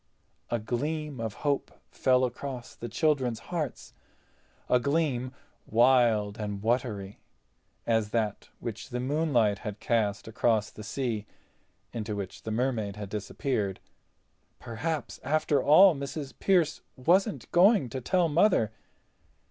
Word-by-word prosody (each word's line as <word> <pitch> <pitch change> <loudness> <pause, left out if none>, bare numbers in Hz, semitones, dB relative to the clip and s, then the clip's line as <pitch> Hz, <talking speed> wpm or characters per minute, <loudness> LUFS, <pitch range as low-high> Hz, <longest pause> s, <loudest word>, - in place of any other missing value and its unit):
A 120 - +1
gleam 145 +5 -3
of 110 -2 -3
hope 140 -1 0 0.2
fell 130 0 +3
across 125 0 -6
the 120 - -7
children's 130 -3 +1 0.2
hearts—a 145 -4 -4
gleam 140 -3 0 0.4
wild 115 -3 +3
and 105 -1 -4
watery 110 -4 -1 0.7
as 110 -2 +1
that 110 -2 -2
which 110 0 -6
the 125 -1 -3
moonlight 130 -6 +1
had 105 -1 -6
cast 110 -4 0
across 110 -1 +1
the - - -11
sea, 110 -3 -3 0.7
into 110 -2 -3
which 100 -2 -6
the 110 - -5
Mermaid 110 -4 -1
had 105 -2 -7
disappeared. 105 -1 -2 0.8
Perhaps 145 +5 -4
after 150 0 +1
all 185 +5 +7
Mrs. 140 0 -5
Pearce 175 -6 +2
wasn't 150 - +1
going 185 - +5
to 130 +1 -5
tell 175 +7 +2
Mother. 160 - +3
125 Hz, 120 wpm, -28 LUFS, 110-145 Hz, 0.8 s, all